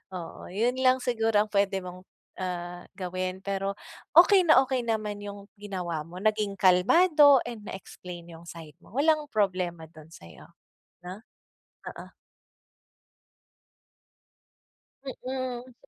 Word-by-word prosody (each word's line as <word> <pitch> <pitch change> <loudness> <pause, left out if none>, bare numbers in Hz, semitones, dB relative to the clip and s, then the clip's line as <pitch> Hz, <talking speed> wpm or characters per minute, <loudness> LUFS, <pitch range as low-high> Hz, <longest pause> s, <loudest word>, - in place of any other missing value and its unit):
oo. 170 -2 -8
Yun 240 +6 0
lang 255 0 +5
siguro 225 -3 0
ang 215 - -20
pwede 200 -1 +1
mong, 180 0 -9 0.4
ah, 175 -1 -5
gawin 185 0 -4
pero 195 0 -2 0.4
okey 360 +2 +7
na 310 - +7
okey 260 0 -1
naman 215 -2 -2
yung 200 0 -9
ginawa 180 -6 -4
mo, 175 +2 -11
naging 215 -2 0
kalmado 285 - +6
and 230 -3 -7
na-explain 180 -2 -9
yung 165 +1 -13
side 160 -3 -11
mo, 215 - -18
walang 305 +1 +2
problema 185 -5 -1
dun 155 -2 -14
sa'yo, 85 - -14 0.6
'no. 185 +3 -8 0.8
Oo. - - -12 2.9
Mm. 255 -1 -5
200 Hz, 115 wpm, -27 LUFS, 180-250 Hz, 2.9 s, okey